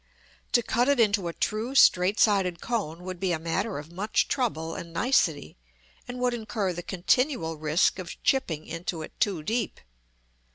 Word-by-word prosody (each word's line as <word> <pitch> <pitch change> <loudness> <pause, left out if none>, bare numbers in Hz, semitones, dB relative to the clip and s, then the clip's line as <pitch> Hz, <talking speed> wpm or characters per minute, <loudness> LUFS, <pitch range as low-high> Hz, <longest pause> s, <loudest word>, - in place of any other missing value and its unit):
To 240 - +4
cut 245 +4 +1
it 285 -3 +3
into 200 -5 +3
a 170 - -4
true 225 +9 -2
straight 190 -4 +5
sided 190 -5 +3
cone 185 -8 -3
would 185 -1 -6
be 185 -2 0
a - - 0
matter 175 +6 -2
of 150 +3 -9
much 200 +5 0
trouble 165 - -1
and 170 +1 -7
nicety, 165 - +1 0.5
and 245 - -6
would 250 -1 +1
incur 215 -4 -2
the 175 - -5
continual 190 - 0
risk 155 +5 +2
of 180 -2 -6
chipping 165 - 0
into 165 0 -4
it - - -9
too 185 -7 0
deep. 225 +3 -2
190 Hz, 170 wpm, -27 LUFS, 165-230 Hz, 0.5 s, straight